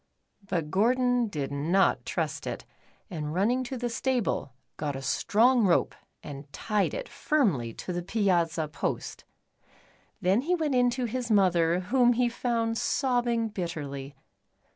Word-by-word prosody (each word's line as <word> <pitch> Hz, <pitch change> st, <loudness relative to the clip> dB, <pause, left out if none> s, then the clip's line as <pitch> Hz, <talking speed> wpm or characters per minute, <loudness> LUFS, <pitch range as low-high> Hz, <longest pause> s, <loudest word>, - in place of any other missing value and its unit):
But 170 Hz, -6 st, -3 dB
Gordon 245 Hz, +4 st, +2 dB
did 145 Hz, -8 st, -4 dB
not 165 Hz, +7 st, +1 dB
trust -, -, -2 dB
it, -, -, -5 dB, 0.5 s
and 155 Hz, -2 st, -4 dB
running 235 Hz, +7 st, +2 dB
to 260 Hz, +1 st, -5 dB
the 245 Hz, 0 st, -2 dB
stable, 240 Hz, -, -1 dB, 0.3 s
got 145 Hz, -2 st, -3 dB
a 135 Hz, -, -5 dB
strong 225 Hz, -, +3 dB
rope 175 Hz, -, +2 dB, 0.3 s
and 140 Hz, 0 st, -9 dB
tied 210 Hz, +3 st, -1 dB
it -, -, -5 dB
firmly 185 Hz, -, 0 dB
to 180 Hz, -, -5 dB
the 175 Hz, -, -2 dB
piazza 175 Hz, -5 st, +1 dB
post. 150 Hz, -, -4 dB, 0.9 s
Then 190 Hz, +6 st, +2 dB
he 350 Hz, +6 st, +1 dB
went 310 Hz, -5 st, -1 dB
in 250 Hz, -1 st, +4 dB
to 245 Hz, +1 st, -2 dB
his 240 Hz, +1 st, -3 dB
mother, 180 Hz, -4 st, +3 dB
whom 245 Hz, +5 st, +3 dB
he 245 Hz, 0 st, +2 dB
found 230 Hz, -1 st, -1 dB
sobbing 240 Hz, -4 st, +1 dB
bitterly. 145 Hz, -8 st, -5 dB
210 Hz, 140 wpm, -28 LUFS, 165-245 Hz, 0.9 s, in